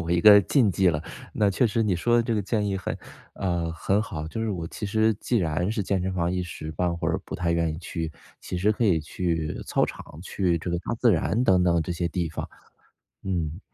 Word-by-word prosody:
我 85 0 -4
一 85 - +3
个 105 +1 +9
禁 115 +2 +3
忌 95 +2 +3
了。 75 -2 0 0.3
那 105 -2 +2
确 120 +6 +2
实 115 +1 0
你 105 -4 +1
说 120 +8 +2
的 120 - +4
这 115 -1 -1
个 105 - +1
建 105 +1 -1
议 100 - -1
很 95 - -4 0.4
呃， 85 -3 -1
很 95 +4 +1
好。 85 -9 -5
就 110 - -5
是 115 - -1
我 85 -4 -3
其 105 - -5
实 110 +1 +3
既 120 +4 -1
然 90 -1 0
是 110 -1 -1
健 95 0 0
身 95 0 -2
房 85 -1 0
一 90 0 -1
时 80 -3 -7
半 85 +2 -1
会 - - -1
儿 - - 0
不 - - -7
太 85 -2 0
愿 85 -1 +1
意 - - -7
去， 85 -2 -4 0.3
其 90 - -5
实 105 +4 +2
可 110 - -3
以 90 -6 +4
去 80 0 -2
操 - - +2
场， - - -7 0.2
去 90 -2 0
这 85 - -4
个 85 - 0
大 95 - -3
自 115 -1 +3
然 105 +8 +1
等 95 -5 +4
等 85 -2 +3
这 90 - -3
些 85 0 -1
地 85 0 -2
方。 - - -5 0.7
嗯。 85 -3 -2
90 Hz, 265 characters per minute, -26 LUFS, 85-105 Hz, 0.7 s, 个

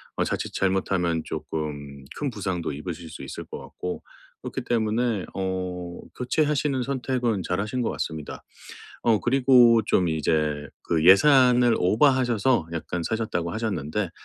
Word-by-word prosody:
어 - - +1
자칫 - - -3
잘못하면 95 -3 0
쪼끔 70 -3 -5
큰 145 - -1
부상도 95 -7 -3
입으실 80 +2 -7
수 75 - -9
있을 65 - -7
것 - - -8
같고 90 - -6 0.4
그렇기 - - -4
때문에 110 -2 0
어 90 -2 -4 0.2
교체하시는 145 +1 0
선택은 125 -6 -1
잘하신 110 +7 -2
것 - - 0
같습니다. 80 -2 -5 0.6
어 115 -3 +3
그리고 125 -3 +5
좀 90 -2 +2
이제 75 -2 0
그 80 -1 0
예산을 125 +3 +6
오바하셔서 120 - +2
약간 85 +1 -3
사셨다고 95 -7 -2
하셨는데 100 -4 -2
95 Hz, 300 characters per minute, -25 LUFS, 85-120 Hz, 0.6 s, 예산을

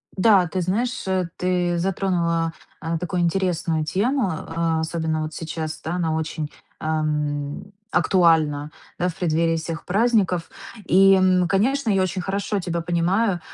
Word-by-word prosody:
Да, 195 -2 +5
ты 185 +3 -2
знаешь, 225 +8 -1 0.3
ты 180 -1 0
затронула, 170 -3 0 0.3
а, 165 0 -2
такую 180 +1 -2
интересную 170 -3 0
тему, 220 - +1
а, 165 0 -2
особенно 160 -1 -1
вот 155 - -5
сейчас, 155 0 -5
да, 160 - -3
она 165 -3 0
очень, 160 -1 -3 0.3
ам, 150 -2 -2 0.3
актуальна, 160 -5 +3 0.3
да, 180 +1 +1
в 165 - -8
преддверии 165 -1 +1
всех 165 +1 -5
праздников. 200 -4 +1 0.4
И, 195 +1 +6 0.3
конечно, 235 +7 +1
я 195 -2 +3
очень 185 0 -1
хорошо 200 +2 -2
тебя 170 -2 -2
понимаю, 175 +4 +1
170 Hz, 135 wpm, -23 LUFS, 160-190 Hz, 0.4 s, И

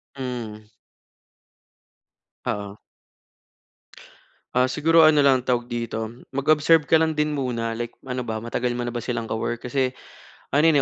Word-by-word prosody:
Hmm. 120 -5 -6 1.8
Oo. 100 0 -3 1.8
Ah, 125 +1 +3
siguro 165 +3 +4
ano 155 -1 +6
lang 135 -3 +4
tawag 120 -1 0
dito 115 -2 -3 0.2
mag-observe 150 +3 +3
ka - - +5
lang 160 0 +3
din 150 -1 0
muna. 115 -4 -2
Like 120 +1 -4 0.2
ano 125 -1 -3
ba, 110 -2 -3
matagal 120 +2 -2
mona 120 0 -3
ba 120 -1 -4
silang 120 -2 -3
ka - - -2
work? 115 +2 -3
Kasi, 130 0 0 0.6
ano 150 +4 +4
yan, 160 - +5
125 Hz, 140 wpm, -24 LUFS, 115-145 Hz, 1.8 s, ano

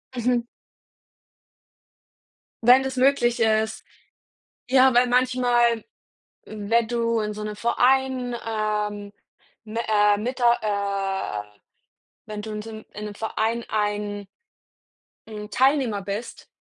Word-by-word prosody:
Mhm. 240 0 0 2.2
Wenn 250 +3 +7
das 265 0 -4
möglich 250 -2 +2
ist, 220 0 +1 0.9
ja, 260 -1 +5
weil 245 +1 +4
manchmal, 245 -2 +2 0.6
wenn 220 +2 0
du 230 -1 0
in 210 0 -3
so 210 0 -6
'nem 210 0 -5
Verein, 250 +2 +1
ähm, 210 -2 -2 0.5
m 215 +2 -7
äh, 210 -2 +3
mit 250 +5 -4
der 240 -1 +4 1.0
äh - - -30 0.7
Wenn 210 -1 -5
du 215 0 -7
in 210 - -4
so 225 - -9
m 220 -1 -9
in 210 +1 -6
'nem 205 -1 -7
Verein 225 +1 -2
ein 205 -1 -2 1.0
'n 210 -1 -8
Teilnehmer 260 -6 +2
bist, 205 +4 -6
225 Hz, 115 wpm, -24 LUFS, 210-245 Hz, 2.2 s, Wenn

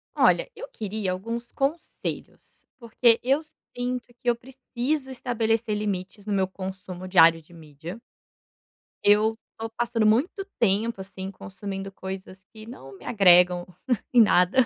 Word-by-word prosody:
Olha, - - +4
eu 485 +3 -7
queria 210 - -3
alguns 230 +6 -5
conselhos. 280 +5 -4
Porque 235 0 +3
eu 270 +4 +2 0.3
sinto 245 0 -3
que 245 - +1
eu 240 - +3
preciso 265 +3 -3
estabelecer 230 -3 0
limites 200 -1 -4
no 210 - -2
meu 190 -1 +2
consumo 185 -1 -7
diário 165 -3 +6
de 160 - -24
mídia. 160 +4 -9 1.1
Eu 215 +2 +4 0.2
tô 225 0 -4
passando 230 -2 +1
muito 270 - +2
tempo, 220 0 +1
assim, 190 0 -7
consumindo 195 +1 -7
coisas 190 0 -8
que 215 -1 -11
não 135 - -11
me 120 - -16
agregam 180 -3 +5 0.5
em 245 - +8
nada 180 +1 +4
210 Hz, 135 wpm, -26 LUFS, 185-235 Hz, 1.1 s, em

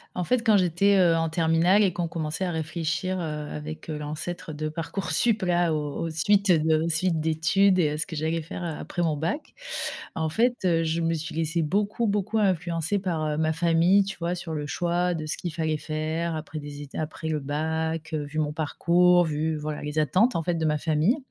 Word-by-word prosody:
En 180 - -1
fait, 245 +4 +1
quand 215 -2 +6
j'étais, 190 +3 +3
heu, 170 -2 +5
en 165 0 +1
terminale 165 +4 +3
et 195 - +3
qu'on 175 0 -2
commençait 160 +2 -3
à 180 - -1
réfléchir, 165 +3 -2
heu, - - -3 0.3
avec, 155 +2 -7
heu, 150 - -3
l'ancêtre 155 +3 -5
de 155 +1 -3
Parcoursup 195 +7 0
là, 175 -2 +2
aux 150 -2 -2
aux 165 - -2
suites 200 +5 +3
de 160 -1 +3
aux 165 - -1
suites 165 0 +1
d'études 175 +5 +3
et 155 - +3
heu, - - -3
ce 155 - -1
que 170 - -7
j'allais 160 +2 -1
faire 175 +2 -7
a 165 -3 -3
après 175 - -4
mon 160 -3 +1
bac. 170 - -3 0.6
En 160 -1 -1
fait, 240 +9 +2
heu, 165 -2 +3
je 165 +1 -1
me 165 0 +1
suis 160 0 -5
laissée 165 +1 0
beaucoup, 205 +7 0
beaucoup 210 +2 0
influencer 175 -1 0
par, 170 -5 -2
heu, 150 -1 -1
ma 160 0 +1
famille, 170 +4 +4
tu 195 +1 -6
vois? 170 +1 -1
Sur 175 -2 -6
le 150 -1 -3
choix 175 +2 0
de 155 -1 -4
ce 155 - -2
qu'il 175 -3 -5
fallait 160 -1 -1
faire 160 +2 -2
après 155 0 -6
des 145 0 -8
étu 140 - -9
après 160 +1 -4
le 155 -1 0
bac, 160 +2 -2
heu, 150 -1 -1
vu 145 +2 -7
mon 150 -1 -1
parcours, 175 +3 +3
vu 155 0 -1
voilà 150 0 -4
les 150 +1 -5
attentes, 190 - +3
en 165 - 0
fait, 175 +1 0
de 160 -1 -1
ma 150 -1 +2
famille 160 - +2
165 Hz, 220 wpm, -26 LUFS, 155-180 Hz, 0.6 s, quand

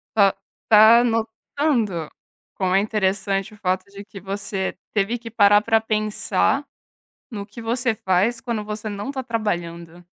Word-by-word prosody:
Está, 200 -3 +4 0.3
está 220 +2 +7
notando 225 - -1 0.5
quão 185 -1 0
é - - +5
interessante 195 -1 -1
o - - -15
fato 185 -1 -1
de 200 0 -9
que 205 -1 -11
você 195 0 -3 0.2
teve 210 +3 0
que 230 -1 -9
parar 205 -2 +5
para 225 +1 +2
pensar 215 -1 0 0.7
no 205 -4 -6
que 215 +3 -11
você 240 +1 0
faz, 200 +4 0
quando 230 -4 -3
você 215 +1 -5
não 205 +3 -5
está 270 -1 -4
trabalhando? 175 -7 -4
210 Hz, 145 wpm, -22 LUFS, 195-225 Hz, 0.7 s, está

